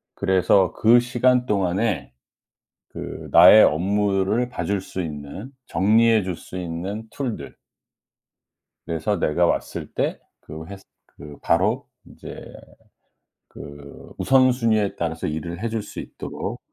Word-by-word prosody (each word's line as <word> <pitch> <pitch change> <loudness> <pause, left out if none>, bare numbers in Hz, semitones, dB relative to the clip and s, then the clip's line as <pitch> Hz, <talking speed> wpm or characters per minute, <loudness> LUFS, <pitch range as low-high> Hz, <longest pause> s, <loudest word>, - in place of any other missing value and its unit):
그래서 95 -1 +2
그 120 +2 +5
시간 125 +1 +1
동안에 95 - -1 0.8
그 - - -8
나의 90 +6 +9
업무를 100 +6 +1
봐 - - -5
줄 100 -1 -1
수 95 0 -5
있는, 75 - -8
정리해 110 +2 +3
줄 90 -3 -4
수 90 - -9
있는 90 +5 -5
툴들 130 -6 -5 1.3
그래서 85 +5 -2
내가 85 +2 +2
왔을 - - -2
때 - - -2 0.2
그 80 +1 -9
회사 95 +2 -10 0.2
그 75 -1 -13
바로 - - +1 0.2
이제 - - -11 1.0
그 70 0 -12
우선순위에 120 -6 +2
따라서 80 -1 -3
일을 85 +4 -5
해 115 - -2
줄 110 -1 -3
수 105 - -9
있도록 - - -7
100 Hz, 220 characters per minute, -22 LUFS, 85-110 Hz, 1.3 s, 나의